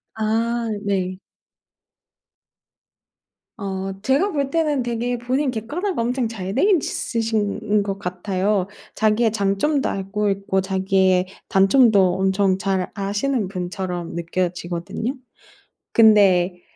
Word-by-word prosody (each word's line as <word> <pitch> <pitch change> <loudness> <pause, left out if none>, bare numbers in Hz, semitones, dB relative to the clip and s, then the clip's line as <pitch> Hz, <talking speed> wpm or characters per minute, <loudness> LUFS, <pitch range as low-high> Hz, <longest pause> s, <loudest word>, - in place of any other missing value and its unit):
아 230 +2 0 0.2
네. 185 -2 -1 2.4
어 195 -2 -4
제가 275 - +2
볼 280 -2 -1
때는 300 -3 +1
되게 240 +1 -2
본인 255 +3 -1
객관화가 290 - -3
엄청 245 +1 0
잘 195 -3 -5
돼 270 - +2
있으신 220 - 0
것 195 -1 -4
같아요. 185 +1 -1 0.3
자기의 220 +1 +2
장점도 220 +8 0
알고 200 +2 -2
있고 195 -1 0
자기의 190 -1 +2 0.2
단점도 195 -2 +4
엄청 190 0 +2
잘 190 -1 -1
아시는 205 +3 -1
분처럼 180 -2 -4
느껴지거든요. 175 +7 -3 0.8
근데 195 -5 +5
200 Hz, 215 characters per minute, -21 LUFS, 190-235 Hz, 2.4 s, 근데